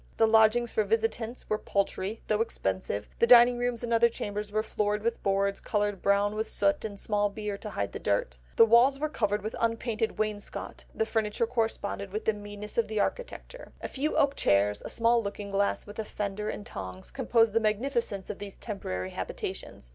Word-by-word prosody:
The 225 - +5
lodgings 220 +2 +4
for 215 - +2
visitants 225 +2 -1
were 215 - 0
paltry, 200 +1 -2
though 215 0 +1
expensive, 100 - -2
the 235 - +4
dining 240 0 +8
rooms 245 -1 -1
and 235 -1 -1
other 235 +1 +5
chambers 210 -2 -4
were 215 +1 0
floored 210 -1 -1
with 230 0 -1
boards 195 0 +1
coloured 205 -2 -1
brown 200 +1 +2
with 220 +1 -2
soot 295 0 +1
and 205 -2 -5
small 205 -1 +1
beer 210 0 -4
to 215 - -6
hide 100 - -3
the - - -6
dirt; 65 -12 -1 0.2
the 230 - +8
walls 240 +5 +5
were 305 +2 -1
covered 210 -7 0
with 215 - -4
unpainted 230 -1 -1
wainscot, 215 -1 -4
the 220 - +1
furniture 220 0 0
corresponded 220 -4 -2
with 215 +2 -4
the 220 - +3
meanness 205 +1 -5
of 230 - +2
the 215 -1 -2
architecture; - - -4
a - - -4
few 295 +3 -2
oak 280 -1 +3
chairs, 100 - +2
a - - -7
small 230 0 +3
looking 200 -1 -5
glass, 200 +1 0
with 205 +1 -10
a - - 0
fender 210 0 -3
and 205 - -5
tongs, 95 -1 -7
composed 230 -3 +2
the 225 - +4
magnificence 220 -2 -1
of 210 - -9
these 200 -1 -7
temporary 95 - -5
habitations. - - -6
215 Hz, 195 wpm, -29 LUFS, 200-230 Hz, 0.2 s, dining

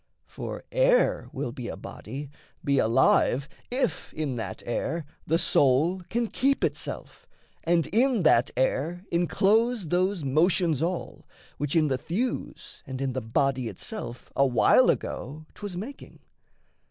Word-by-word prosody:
For - - -7
air - - +3
will - - -3
be - - -6
a - - -5
body, 140 +1 -8 0.3
be 140 -1 +2
alive, 120 +4 +3 0.2
If 250 -8 -1
in 150 -5 -2
that 110 - -5
air 155 +7 -2 0.2
the 165 - +3
soul 160 +3 +3
can 235 +1 0
keep 270 +5 +1
itself, - - -4 0.4
And 165 -2 +3
in 230 - +2
that 125 -5 +4
air 160 +8 0
enclose 200 +4 +2
those 185 0 +1
motions 160 +2 +2
all 175 +1 -3 0.3
Which 145 +2 -1
in 155 -2 +4
the 130 -2 0
thews 230 - -4
and 130 -1 -5
in 135 -1 -1
the 130 - -2
body 130 +2 0
itself 120 - -7
A 140 - +4
while 125 -2 +5
ago 155 +4 -3
'twas 205 -4 -7
making. 250 +9 -8
165 Hz, 140 wpm, -27 LUFS, 135-200 Hz, 0.4 s, while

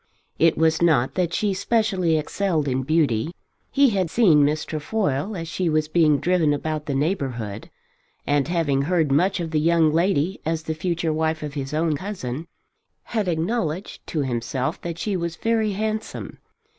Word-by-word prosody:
It 165 0 +4
was 160 0 +2
not 155 -7 +3
that 180 -2 0
she 205 +1 0
specially 190 -5 +1
excelled 155 -1 -1
in 130 0 0
beauty. 150 0 +1 0.3
He 280 -3 +4
had 190 -4 0
seen 165 -9 +5
Miss 150 +1 +1
Trefoil 155 +2 -2
as 165 -1 -5
she 170 +1 -1
was 155 -1 +1
being 155 -2 +3
driven 175 -4 +2
about 155 0 -4
the 140 - -1
neighbourhood, 130 - -2 0.6
and 145 -1 +1
having 160 -6 +1
heard 160 -1 +1
much 180 +7 +2
of 165 -2 -3
the 155 - +1
young 160 -1 +3
lady 175 +1 +1
as 160 0 -2
the 160 - -2
future 165 0 -1
wife 160 0 -1
of 150 -1 -5
his 135 -2 -4
own 155 0 +1
cousin, 160 -5 -5 0.6
had 215 -4 -2
acknowledged 175 +1 -2
to 155 - -1
himself 130 +3 -2
that 170 -1 -5
she 205 +2 -2
was 170 -2 -2
very 220 +1 0
handsome. 215 +2 -4
160 Hz, 170 wpm, -23 LUFS, 150-185 Hz, 0.6 s, seen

